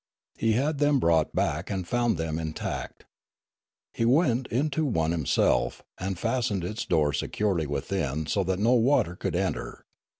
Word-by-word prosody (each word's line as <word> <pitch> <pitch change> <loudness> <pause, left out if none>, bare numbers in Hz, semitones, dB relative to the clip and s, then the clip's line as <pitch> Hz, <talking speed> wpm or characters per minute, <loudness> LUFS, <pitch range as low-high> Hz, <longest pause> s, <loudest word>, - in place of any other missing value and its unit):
He 115 -1 +1
had 140 +5 0
them 145 -1 +3
brought 80 -6 +2
back, 75 +5 -1
and 95 -3 -3
found 120 -3 +1
them 80 0 -2
intact. 80 -1 -5 0.9
He - - -1
went 125 -1 +3
into 145 +5 0
one 80 - +1
him 80 -5 -3
self, - - +1 0.2
and 95 0 -3
fastened 115 -3 -1
its 105 +5 -4
door 75 -2 +2
securely 85 +1 -1
within 70 +1 -2
so 100 +6 0
that 95 0 0
no 115 +5 +3
water 120 -7 +3
could 95 -1 -3
enter. 95 +1 -3
95 Hz, 160 wpm, -27 LUFS, 80-120 Hz, 0.9 s, them